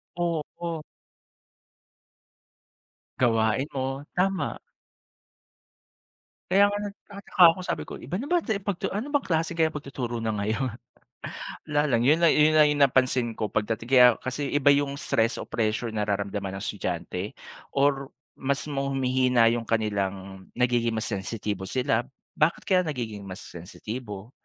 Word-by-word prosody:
Oo. 170 -1 -3 2.4
Gawain 115 +1 +2
mo, 135 +1 -3
tama. 190 +1 0 1.9
Kaya 195 +2 +6
nga, 205 - -1
nagtataka 200 -2 -3
ako, 185 - -9
sabi 180 - -3
ko, - - -9
iba 145 +9 -4
na 235 - -3
ba 350 +4 +2
tu 220 -10 -1
pagtu 200 -4 -2
ano 245 +9 -4
bang 285 - +3
klase 165 -1 +1
kaya 165 -1 +2
pagtuturo 140 -5 -5
na 115 -1 -1
ngayon, 105 +5 -1 1.0
wala 150 -1 +2
lang, 125 -6 +2
yun 160 +3 +4
na 165 - +7
yun 155 +1 +4
na 155 - +8
yung 150 -1 +2
napansin 130 -4 +3
ko 105 -2 -3
pagdating 115 +3 -2
kaya 125 -2 +9 0.2
kasi 135 +3 -2
iba 145 0 +4
yung 140 0 +1
stress 115 -7 +1
o - - -5
pressure 110 +1 -1
na 105 -1 -2
nararamdaman 100 -1 -2
ng 100 - -6
estudyante 90 0 -4 0.4
or 140 -1 +2 0.3
mas 140 +1 -1
ma 140 0 -1
humihina 130 -3 +3
yung 115 -1 -2
kanilang 100 -3 -2
nagiging 120 -2 +1
mas 110 - -1
sensitibo 100 -1 -3
sila. 125 +1 0 0.3
Bakit 155 +2 +2
kaya 185 -2 +3
nagiging 110 -8 -4
mas 95 0 -8
sensitibo, 105 +5 -8
130 Hz, 140 wpm, -26 LUFS, 110-150 Hz, 2.4 s, kaya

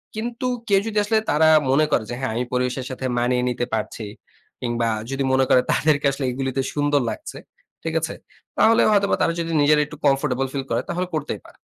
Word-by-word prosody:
কিন্তু 235 +3 -3 0.2
কেউ 200 -2 +4
যদি 215 -1 -3
আসলে 220 +1 +2
তারা 155 +2 +4 0.2
মনে 155 +3 +4
করে 110 - +2
যে, 120 - -3
হ্যাঁ, 135 -4 -2
আমি 125 - 0
পরিবেশের 125 +1 -1
সাথে 130 0 -5
মানিয়ে 125 +1 +1
নিতে 120 0 -2
পারছি। 110 0 -3 0.6
কিংবা 120 -1 -1 0.2
যদি 135 0 -2
মনে 130 0 +3
করে 125 - +6
তাদেরকে 150 -1 +2
আসলে 135 -1 -3
এগুলিতে 135 +1 -3
আসলে - - -4
সুন্দর 145 -1 +2
লাগছে। 315 - -8 0.5
ঠিক - - -2
আছে? - - -3 0.4
তাহলে 225 +1 +5
হয়তো 200 -1 +3
বা - - +4
তারা 165 - +2
যদি 165 0 -2
নিজেরা 150 +1 +4
একটু 150 0 -11
কমফোর্টেবল 135 -1 +1
ফিল 135 -1 -2
করে 115 +2 +1
তাহলে 180 +1 -2
করতেই 150 -2 -3
পারে। - - -17
135 Hz, 205 wpm, -22 LUFS, 125-160 Hz, 0.6 s, করে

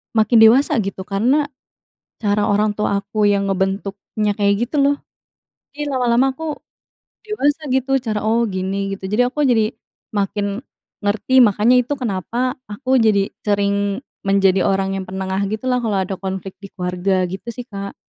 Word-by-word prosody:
makin 220 +1 +4
dewasa, 245 +5 +6
gitu. 195 -2 -3
Karena, 235 +10 +1 0.8
cara 205 0 +2
orang 210 +1 +2
tua 205 -1 -1
aku 210 +1 0
yang 200 -1 +1
ngebentuknya 195 +2 -2
kayak 200 0 +3
gitu, 275 +5 -1
lo. 280 0 +4 0.8
Iya, 295 0 -4
lama-lama 250 +2 +3
aku 305 +3 -4 0.7
dewasa, 310 -7 0
gitu, 265 0 +1
cara 220 -4 -3
"Oh, 230 +2 +2
gini," 195 0 -2
gitu. 190 -1 -7
Jadi, 240 +4 +3
aku 290 +4 -2
jadi 230 -5 +2 0.4
makin 205 +2 -1 0.4
ngerti. 220 +6 +3
Makanya, 220 +2 +4
itu 280 +4 -4
kenapa, 240 +2 -2 0.2
aku 260 +5 -1
jadi 200 -3 +3 0.2
sering 200 0 0 0.2
menjadi 195 -1 +3
orang 195 0 0
yang 195 - -3
penengah 190 +1 -2
gitulah, 250 +3 -1
kalau 215 -4 0
ada 195 - -3
konflik 190 0 -5
di 200 - -9
keluarga. 180 +1 -1
Gitu 190 +6 -6
sih, 245 +1 -8
Kak. 200 -3 -7
210 Hz, 155 wpm, -19 LUFS, 195-245 Hz, 0.8 s, dewasa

